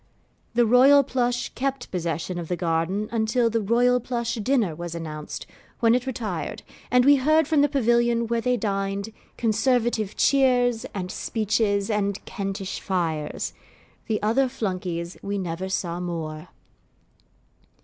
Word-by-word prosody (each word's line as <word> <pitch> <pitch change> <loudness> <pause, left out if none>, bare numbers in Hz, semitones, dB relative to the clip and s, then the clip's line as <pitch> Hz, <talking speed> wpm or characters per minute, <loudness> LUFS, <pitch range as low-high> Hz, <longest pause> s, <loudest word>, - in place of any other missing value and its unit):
The 240 0 +5
Royal 265 +5 +6
Plush 245 -1 -1
kept 270 -1 -3
possession 170 0 -3
of 170 - -5
the 180 - -1
garden 175 +4 -1
until 230 +1 +1
the 225 0 +1
Royal 245 +4 +3
Plush 235 -1 -2
dinner 225 - +1
was 170 0 -6
announced, 155 -2 -6 0.3
when 230 -1 +4
it 250 +1 0
retired, 235 -4 -4 0.3
and 250 0 +4
we 285 0 +7
heard 310 +3 +3
from 305 -3 +3
the 290 - +3
pavilion 240 -3 +2
where 230 0 -1
they 250 +1 +1
dined, 200 -1 -2 0.3
conservative 225 -2 +1
cheers, 250 -3 +3
and 185 -2 -3
speeches, 215 -2 0
and 200 -2 -1
Kentish 195 -1 -4
fires. 165 -6 -2 0.5
The 215 -2 0
other 245 +6 +3
Flunkeys 185 -7 -4
we 200 0 -3
never 185 0 -3
saw 175 -2 -2
more. 165 -2 -5
220 Hz, 140 wpm, -25 LUFS, 185-245 Hz, 0.5 s, we